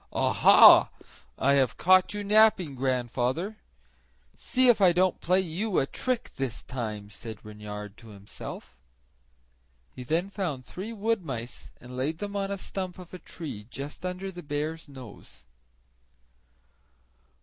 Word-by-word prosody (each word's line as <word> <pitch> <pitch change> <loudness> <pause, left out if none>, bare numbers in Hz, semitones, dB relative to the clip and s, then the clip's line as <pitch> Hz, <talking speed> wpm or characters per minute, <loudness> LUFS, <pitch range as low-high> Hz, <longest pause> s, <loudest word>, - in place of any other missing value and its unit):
"Aha! - - +7 0.5
have 135 -1 +3
I - - -30
caught 185 +1 +4
you 205 - -3
napping, 210 -6 +4
grandfather? 130 - -1 0.8
See 255 0 +1
if 235 -4 +5
I 180 -3 +6
don't 185 +1 +1
play 185 +2 +2
you 190 +4 -2
a - - +3
trick 250 - -3
this 135 -4 -4
time!" 105 -5 -6
said 110 0 -10
Reynard 105 -1 -8
to 115 - -15
himself. 100 - -10 1.2
He - - -8
then 170 +9 -1
found 150 -11 -4
three 195 - -7
wood 225 -2 -1
mice 125 -5 -7
and 125 +1 -11
laid 140 +5 -2
them 205 +3 -6
on 195 -1 -1
a 200 - -3
stump 185 -1 -6
of 180 -1 -12
a 185 - -7
tree 125 -15 -8
just 140 +6 -8
under 185 +1 -4
the 175 -1 -9
bear's 155 +1 -4
nose. 105 - -12
155 Hz, 140 wpm, -27 LUFS, 125-190 Hz, 1.2 s, Aha